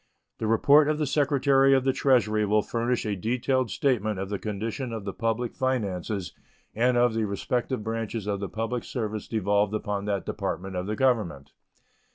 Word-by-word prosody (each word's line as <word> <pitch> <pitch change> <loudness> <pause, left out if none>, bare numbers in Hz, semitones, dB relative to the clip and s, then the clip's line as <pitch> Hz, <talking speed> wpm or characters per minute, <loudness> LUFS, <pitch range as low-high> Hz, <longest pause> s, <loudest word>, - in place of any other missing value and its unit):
The 110 - -1
report 140 +7 +5
of 155 - +1
the 150 - 0
Secretary 135 -1 +3
of 130 - +2
the 135 0 +2
Treasury 115 -6 +2
will 105 0 +2
furnish 120 +1 -1
a 105 -1 -1
detailed 125 +4 0
statement 110 -3 0
of 95 0 -4
the 100 -2 -3
condition 110 +4 -4
of 110 -3 -5
the 100 - -4
public 115 +1 -1
finances 105 -7 -2 0.4
and 120 +2 +2
of 120 -1 +3
the 110 -1 0
respective 115 +4 -2
branches 115 -1 -3
of 100 -1 -1
the 100 - -4
public 115 +2 -3
service 110 -4 -4
devolved 105 -1 +1
upon 105 -1 -3
that 100 -2 -2
Department 95 +1 -4
of 90 +1 -3
the 105 - -1
Government. 105 - 0
110 Hz, 180 wpm, -26 LUFS, 105-125 Hz, 0.4 s, report